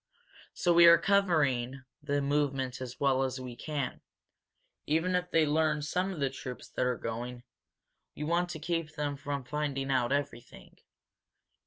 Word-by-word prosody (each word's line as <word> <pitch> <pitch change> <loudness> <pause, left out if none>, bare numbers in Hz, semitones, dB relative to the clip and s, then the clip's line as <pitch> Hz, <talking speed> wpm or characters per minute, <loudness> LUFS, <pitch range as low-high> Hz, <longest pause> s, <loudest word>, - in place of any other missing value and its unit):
So 175 - +2
we 170 0 +8
are 170 0 +9
covering 150 -10 +1 0.2
the 145 -1 -1
movement 140 -3 0
as 125 -1 -7
well 135 -2 +2
as 130 0 -1
we 125 -2 -7
can. 140 0 -4 0.9
Even 165 +5 +1
if 180 0 0
they 160 -2 +3
learn 150 0 +1
some 180 +6 -1
of 180 - -6
the 135 -2 0
troops 130 -2 -7
that 125 - -1
are 125 -1 0
going, 120 +2 -5 0.7
we 150 - -5
want 170 +3 +1
to 165 - -5
keep 165 -1 -3
them 145 -2 -2
from 140 -1 -4
finding 135 0 -2
out 125 -2 +1
everything. 140 -4 -4
145 Hz, 160 wpm, -30 LUFS, 130-160 Hz, 0.9 s, are